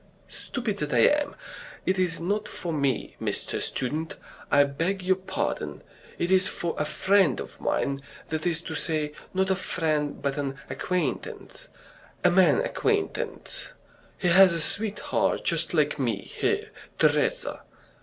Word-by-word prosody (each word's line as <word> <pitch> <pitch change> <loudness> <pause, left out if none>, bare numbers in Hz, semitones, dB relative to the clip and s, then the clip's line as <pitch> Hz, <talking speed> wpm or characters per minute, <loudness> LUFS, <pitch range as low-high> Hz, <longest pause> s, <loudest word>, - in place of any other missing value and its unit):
"Stupid 230 -6 -4
that 150 -2 -2
I 120 - +5 0.2
am! 290 - -5 0.5
It 185 0 +1
is 180 -3 +1
not 205 +5 -1
for 170 -3 -5
me, 140 -5 0
Mr. - - -2
Student, 155 +6 -2 0.3
I 145 - +6
beg 165 +7 -1
your 185 +1 +3
pardon. 190 0 -3 0.3
It 175 +2 -1
is 185 0 +5
for 170 - -2
a 150 - +1
friend 165 +2 +3
of - - -8
mine, 140 0 0 0.3
that 160 +2 -1
is 165 -1 0
to - - -6
say, 155 -3 -1 0.2
not 190 0 +1
a - - +4
friend 155 -5 -1
but 140 0 -1
an 135 -1 -2 0.2
acquaintance 175 -9 -3 0.6
a 180 - +6
man 190 - +5
acquaintance. - - -2 0.5
He 180 - +1
has 185 +1 +8
a 165 - -1
sweetheart 210 +6 0
just - - +1
like - - +2
me - - +1
here, 435 0 -2 0.3
Teresa. - - +2
175 Hz, 145 wpm, -27 LUFS, 150-195 Hz, 0.6 s, has